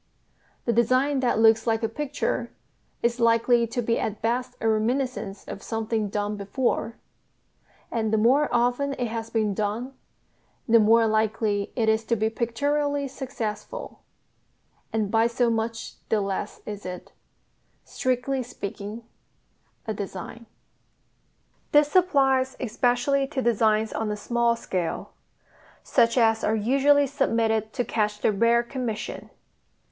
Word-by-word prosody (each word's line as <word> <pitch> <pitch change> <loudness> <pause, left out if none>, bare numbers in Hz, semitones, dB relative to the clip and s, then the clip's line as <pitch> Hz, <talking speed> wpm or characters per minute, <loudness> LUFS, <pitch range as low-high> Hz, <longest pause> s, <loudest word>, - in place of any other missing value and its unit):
The 235 - +1
design 255 +5 +2
that 250 -4 +1
looks 225 +1 +4
like 225 0 +1
a - - +2
picture 290 +5 -2 0.5
is 235 +1 +1
likely 230 +1 +3
to 240 +2 -3
be 230 +1 +1
at 210 -1 -3
best 240 +3 -1
a 225 - -1
reminiscence 220 -2 -1
of - - -7
something 225 -1 -2
done 205 +1 -2
before; 230 +2 -1 1.0
and 220 -2 -1
the 220 - +3
more 260 +7 +3
often 245 +4 +1
it 245 -3 -3
has 225 0 -4
been 215 -3 0
done 215 +6 -3 0.7
the 230 0 +6
more 225 +2 +5
likely 215 -2 0
it 230 -3 +1
is 220 0 +2
to 230 - +1
be 220 0 0
pictorially 285 +5 -1
successful 265 - -6 0.9
and 215 -2 -1
by 225 0 +4
so 235 0 +1
much 225 0 -3 0.2
the 220 - +2
less 195 -1 -3
is 210 -1 -6
it, 180 -1 -7 0.7
strictly 255 +1 -1
speaking, 215 -2 -7 0.8
a 220 - -2
design. 200 +3 -7 1.3
This 295 +1 +4
applies 270 -7 +3
especially 245 +3 +1
to 280 -1 -4
designs 220 -2 +2
on 220 -1 -2
a 210 - -2
small 235 +2 +1
scale, 180 -6 -4 0.7
such 235 -1 +2
as 225 -2 +3
are 215 - +2
usually 275 +6 +3
submitted 230 -6 0
to 245 - -1
catch 210 -1 -1
the - - +3
rare 230 +3 +3
commission. 235 -3 -5
230 Hz, 135 wpm, -25 LUFS, 220-255 Hz, 1.3 s, the